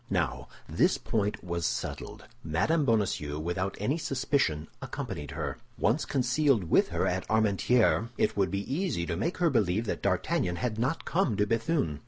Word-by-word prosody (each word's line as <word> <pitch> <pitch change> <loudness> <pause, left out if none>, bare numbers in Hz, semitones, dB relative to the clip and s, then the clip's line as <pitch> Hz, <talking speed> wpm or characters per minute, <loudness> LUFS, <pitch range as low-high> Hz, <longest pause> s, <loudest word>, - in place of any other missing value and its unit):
Now, - - -1 0.2
this - - +2
point 105 -2 -1
was 85 -1 -3
settled; - - -3 0.2
Mme. 105 - +1
Bonacieux, 95 - 0
without 90 +5 -2
any 135 +11 0
suspicion, 130 - 0
accompanied 75 -2 -5
her. - - -4 0.2
Once 120 +8 +1
concealed 130 -3 +2
with - - +5
her - - -1
at 90 +1 -1
Armentières, 110 +2 +3
it - - +1
would 100 -2 +2
be 100 +7 -3
easy 165 - -1
to 85 - -2
make 170 - -2
her 170 -3 +2
believe 110 -2 +1
that - - -3
D'Artagnan 90 -1 0
had 110 +1 -2
not 130 +8 -1
come 165 - +1
to 105 - +3
Béthune. 115 - 0
110 Hz, 165 wpm, -29 LUFS, 90-135 Hz, 0.2 s, with